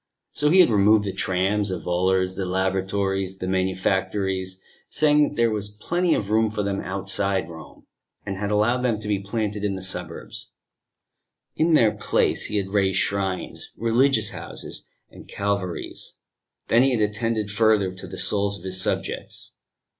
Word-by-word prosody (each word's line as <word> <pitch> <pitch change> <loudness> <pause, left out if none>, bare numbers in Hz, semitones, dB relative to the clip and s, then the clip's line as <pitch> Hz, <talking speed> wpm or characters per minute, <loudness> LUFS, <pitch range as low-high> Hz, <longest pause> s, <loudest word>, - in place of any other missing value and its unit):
So 150 0 +3
he 185 +4 +7
had 175 - +4
removed 105 +1 +5
the 100 - -3
trams, 95 +3 +1
the 95 - -2
volors, 95 +2 +1
the 95 - -3
laboratories, 95 +1 -1
the 90 - -5
manufactories 95 0 -1 0.3
saying 150 -1 +3
that - - -11
there 115 -2 +2
was 105 -1 -3
plenty 170 - 0
of 105 0 -3
room 110 0 +3
for 105 -1 -2
them 100 0 -2
outside 95 +1 0
Rome 80 -1 -12 0.4
and 100 - -3
had 100 +1 -3
allowed 105 +4 +2
them 120 -4 0
to 105 - -7
be 105 -2 +1
planted 105 0 -3
in 100 -2 0
the 95 - -6
suburbs: 90 -3 -5 1.1
in 160 0 +3
their 115 -7 +5
place - - +1
he 105 - -2
had 95 -1 -2
raised 95 -2 +1
shrines, 95 -2 -2
religious 115 0 +3
houses - - -6 0.2
and - - -13
Calvaries. 100 -3 -2 0.5
Then 115 - +5
he 130 -2 +3
had - - -1
attended 110 -1 -2
further 105 -3 +2
to 95 - -8
the - - -8
souls 100 -1 +2
of 85 - -15
his 95 0 0
subjects. - - -2
100 Hz, 165 wpm, -24 LUFS, 95-110 Hz, 1.1 s, he